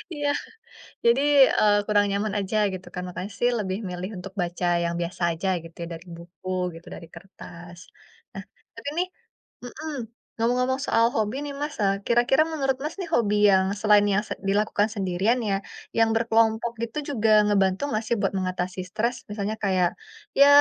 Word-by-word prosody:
Iya, 290 0 -1 0.8
jadi, 235 +4 +5 0.4
eee, 205 -1 +5
kurang 205 -1 +3
nyaman 200 +1 -1
aja 200 +2 -2 0.2
gitu 185 0 -8
kan. 180 - -3
Makanya 185 +3 -6
sih, 245 - +3
lebih 190 -1 -2
milih 180 +2 -5
untuk 190 +1 -8
baca 175 +1 -2 0.2
yang 170 0 -1
biasa 170 +1 -5
aja 165 +4 -3 0.2
gitu 165 0 -13
ya, - - -5
dari 165 +2 -10
buku 175 +2 -11 0.3
gitu, 165 - -13
dari 165 - -10
kertas. 175 -1 -12 0.5
Nah, - - -7 0.3
tapi 285 - -5
nih 365 - +1 0.6
mhm, 305 +6 -7 0.5
ngomong-ngomong 250 +3 +1
soal 230 - +4
hobi 220 +4 0
nih, 285 - -5
Mas, 295 0 -3
eee, 195 0 +3
kira-kira 240 +5 +4
menurut, 270 -3 0
Mas, 305 - -4
nih, 350 -3 -4
hobi 210 -3 +2 0.2
yang 190 0 +4 0.2
selain 210 -1 +5
yang 205 +3 +2
se - - -3 0.2
dilakukan 205 +1 +2
sendirian 195 +5 +1
ya, 195 - +2 0.4
yang 225 0 +4
berkelompok 225 0 +2
gitu 235 +5 -5 0.2
juga 220 -2 +1 0.2
ngebantu 195 -1 +2
nggak 215 -3 -1
sih 235 - +2
buat 195 - 0
mengatasi 185 0 -3
stres? 235 +5 -1
Misalnya 210 +1 -3
kayak, 185 -3 +3 0.5
ya, 280 - +9
205 Hz, 170 wpm, -25 LUFS, 185-235 Hz, 0.8 s, ya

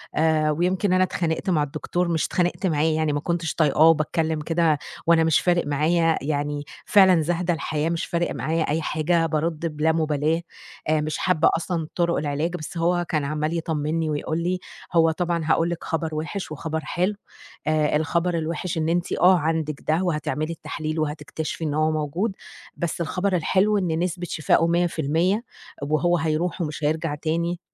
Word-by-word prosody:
آآ 155 -1 +2
ويمكن 180 +4 +1
أنا 185 0 +4
اتخانقت 170 0 -1
مع 155 -4 +2
الدكتور 155 +5 -2
مش 165 -2 +1
اتخانقت 180 +2 0
معاه 150 -2 +1
يعني 155 -1 +1
ما 145 - 0
كنتش 170 +1 -2
طايقاه 155 0 +4
وباتكلّم 160 0 +1
كده 160 -1 +2 0.3
وأنا 165 -1 +5
مش 160 -2 +4
فارق 175 -3 +1
معايا 160 +3 +2
يعني 145 0 -2 0.2
فعلًا 190 -5 +6
زاهدة 175 +2 0
الحياة 160 0 -2
مش 170 -1 -1
فارق 170 0 -1
معايا 160 +1 0
أي 160 +2 0
حاجة، 165 +2 +1
بارُد 160 +1 -1
بِلا 160 +1 +3
مُبالاة، 155 0 0 0.5
آآ 155 -1 +3
مش 155 +1 -2
حابّة 170 -4 +3
أصلًا 165 -2 -3
طُرُق 170 -1 +1
العلاج، 150 +4 -1
بس 160 +1 -7
هو 175 +1 +1
كان 155 -3 0
عمّال 155 +3 -1
يطمّني 160 0 -1
ويقول 155 +2 -2
لي: 180 +1 0 0.3
"هو 165 -1 +5
طبعًا 170 0 -1
هاقول 165 +1 +2
لِك 170 -2 -4
خبر 160 -1 -2
وِحِش 165 +4 -4
وخبر 160 +1 -3
حلو، 180 +6 0 0.5
آآ 155 -1 +2
الخبر 170 +3 0
الوِحِش 165 +1 -3
إن 160 0 0
أنتِ 175 +1 0
آه 185 +1 +5
عندِك 155 -2 -1
ده 160 +4 +2
وهتعملي 155 -1 -1
التحليل 155 0 -4
وهتكتشفي 155 +1 -4
إن 145 -1 -1
هو 155 +1 +2
موجود، 155 +8 -1 0.4
بس 170 -1 -3
الخبر 180 +3 0
الحلو 195 +5 +2
إن 165 -4 0
نسبة 180 0 -2
شِفائه 160 +2 +2
100% 170 - +1 0.4
وهو 160 +4 +2
هيروح 160 +3 -1
ومش 150 -2 -3
هيرجع 155 0 0
تاني 170 +3 -2
160 Hz, 170 wpm, -24 LUFS, 155-175 Hz, 0.5 s, فعلًا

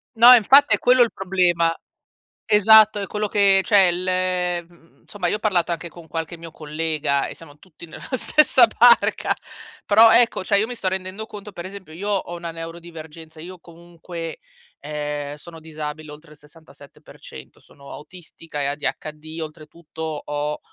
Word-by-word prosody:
No, 235 +2 +8
infatti 265 +5 +5
è - - -9
quello 250 0 +4
il 235 - +3
problema. 175 -3 0 0.7
Esatto, 215 0 +5
è 200 - -4
quello 210 +1 -3
che 195 -2 +3
cioè 195 -4 +4
l 180 -1 -2
mhmm, 170 -1 -26
somma, 190 -4 -4
io 210 - -1
ho - - -22
parlato 185 -5 0
anche 170 0 -5
con 170 0 -15
qualche 165 +1 -5
mio 165 0 -11
collega 155 -2 -2
e - - -9
siamo 145 -3 -16
tutti 170 +1 -15
nella 165 - -13
stessa 260 -2 +3
barca. 235 +2 +3 0.5
Però, 220 +2 +6
ecco, 235 -5 +3
cioè, 200 +1 +2
io 215 - 0
mi 245 - -7
sto 195 -5 -2
rendendo 190 +3 -5
conto, 210 -1 -11
per 175 - -8
esempio, 185 -4 -11
io 200 +5 -6
ho 190 -4 -3
una 170 -1 -7
neurodivergenza. 165 -1 -11
Io 180 +3 -10
comunque, 170 -1 -10 0.4
ehm, 145 -1 -5
sono 165 +2 -13
disabile 155 -1 -8
oltre 150 +1 -14
il 150 - -21
67%, 155 +2 -16
sono 140 -1 -15
autistica 160 -2 -10
e - - -1
ADHD, 155 +2 -5
oltretutto 155 +1 -11 0.2
ho, 150 0 -4
170 Hz, 160 wpm, -21 LUFS, 155-200 Hz, 0.7 s, No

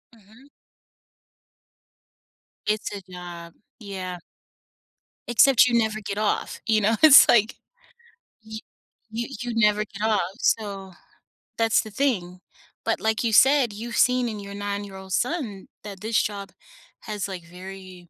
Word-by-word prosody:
Mhm. 225 +6 -20 2.2
It's 215 0 -1
a 200 - -7
job. 175 -2 -9 0.3
Yeah. 185 -4 -6 1.1
Except 250 +1 +5
you 240 - +1
never 220 -1 0
get 200 +1 -5
off, 215 -1 -1
you 220 -2 +2
know, 220 +3 +2
it's 300 -3 +9
like, 220 -1 +4 0.9
y 220 0 -8 0.5
you 235 +1 -3
you 240 -1 -4
never 210 -1 +2
get 200 0 -11
off. 205 -4 0
So 195 -4 -1 0.6
that's 225 -1 +3
the 215 - -10
thing. 190 -9 -1 0.5
But - - -1
like 220 +1 0
you 225 - 0
said, 265 -3 +5
you've 230 +3 -6
seen 250 -1 +3
in 210 -1 -6
your 200 0 -9
nine-year-old 200 -2 -6
son 245 - -2 0.2
that 200 -2 -9
this 220 +1 +1
job 200 -1 -5 0.5
has 210 -2 -4
like, 185 -3 -7
very, 185 0 -11
210 Hz, 135 wpm, -24 LUFS, 195-225 Hz, 2.2 s, it's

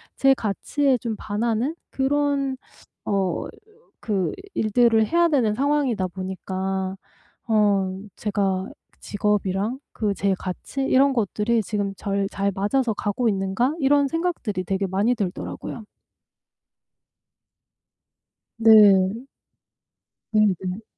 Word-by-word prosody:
제 270 0 +4
가치에 260 +5 0
좀 225 -2 -3
반하는 230 +7 -1
그런 275 0 0 0.5
어 195 -3 -1 0.5
그 195 -5 -1 0.2
일들을 225 0 +3
해야 340 +4 +3
되는 235 -8 +2
상황이다 270 -7 +1
보니까 190 +1 -4 0.5
어 200 -4 +2 0.2
제가 195 -3 -1 0.3
직업이랑 205 +3 -1
그 210 -2 -1
제 195 0 0
가치 190 +8 -5
이런 270 +1 +4
것들이 225 0 0
지금 205 -1 -2
절 200 0 -1
'잘 200 0 -1
맞아서 220 +4 +1
가고 220 +4 -1
있는가?' 195 +7 0
이런 285 0 +3
생각들이 320 - -2
되게 195 +1 -1
많이 205 +7 +1
들더라고요. 210 +2 -5 2.7
네. 215 0 +6 1.1
네네. 195 -2 +1
210 Hz, 205 characters per minute, -23 LUFS, 195-255 Hz, 2.7 s, 네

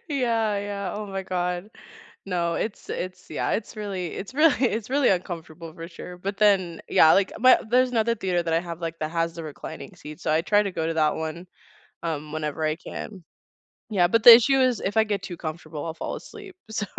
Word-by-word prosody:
Yeah, 230 -7 0
yeah. 200 -2 -4
Oh 210 0 -5
my 195 -1 -4
god. 180 +1 -2 0.6
No, 175 -3 -1
it's 215 +4 -4
it's 180 0 -5
yeah, - - -2
it's 215 - -3
really 200 -4 -4
it's 195 - -7
really 295 -2 +4
it's 220 0 -2
really 275 0 +3
uncomfortable 165 -3 -3
for 165 -1 -8
sure, 180 +1 -10
but 195 +2 -4
then 190 -5 +2
Yeah, 160 - +6
like, 195 0 +2
my 255 +2 +7
there's 250 +1 +3
another 230 0 +1
theater 185 -4 0
that 165 -1 -1
I 165 - +3
have, 170 -1 -7
like 165 0 -4
that 155 0 -3
has 165 0 -1
the 165 -1 -7
reclining 145 -2 -9
seats, 150 0 -11
so - - 0
I 155 - +3
try 205 +4 +3
to 200 - -3
go 160 -2 -2
to 165 - -1
that 155 -1 +2
one, 160 +3 -5 0.6
um, 155 -2 -4
whenever 155 0 -3
I 155 0 +1
can. 185 +2 -8 0.7
Yeah, 185 -5 +3
but 230 +5 +2
the 240 - +13
issue 265 +3 +3
is, 255 -3 +2
if 200 +3 -3
I 220 - +5
get 205 -3 -2
too 185 -2 -6
comfortable, 155 -1 -6
I'll 165 - -4
fall - - -5
asleep. 405 -4 -11
So 220 -1 -2
185 Hz, 215 wpm, -25 LUFS, 165-215 Hz, 0.7 s, the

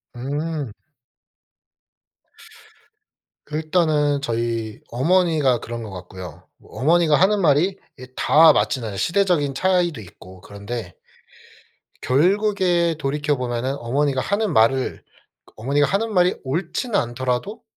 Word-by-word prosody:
음. 145 +1 -4 2.8
일단은 155 -2 +1
저희 115 -3 -3
어머니가 155 -1 +2
그런 120 +1 -6
것 110 - -8
같고요. 90 -3 -10
뭐 - - -12
어머니가 165 +1 +4
하는 200 +5 +3
말이 170 +4 +2 0.2
이 130 - -9
다 160 0 +6
맞지는 115 -9 -1
시대적인 170 - +1
차이도 175 -4 +1
있고 95 -1 -14
그런데 100 -1 -7 1.1
결국에 180 +2 +2
돌이켜 145 0 -1
보면은 125 +1 -3
어머니가 135 +2 0
하는 200 0 -1
말을 125 +4 +2 0.4
그 - - -23
어머니가 140 +6 +1
하는 220 +3 -1
말이 180 -1 +3
옳지는 175 - -2
않더라도 125 - -3
145 Hz, 255 characters per minute, -21 LUFS, 120-175 Hz, 2.8 s, 다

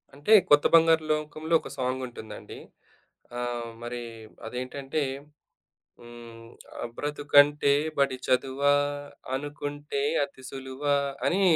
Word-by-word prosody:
అంటే 145 +10 +2 0.2
కొత్త 145 0 +6
బంగారు 165 -1 +5
లోకంలో 155 +1 -2
ఒక - - -9
సాంగ్ 130 0 -1
ఉంటుందండి. 110 -3 -10 0.8
ఆహ్, 120 -1 -3
మరి 120 0 -5 0.5
అదేంటంటే 135 +5 -4 1.0
హ్మ్. 120 -1 -12 0.5
బ్రతుకంటే 145 0 +4 0.3
బడి 135 -2 +2
చదువా, 135 +2 +2 0.6
అనుకుంటే 145 0 -4 0.2
అతిసులువా 135 +1 -3 0.3
అని 190 +3 +2
140 Hz, 90 wpm, -27 LUFS, 125-145 Hz, 1.0 s, కొత్త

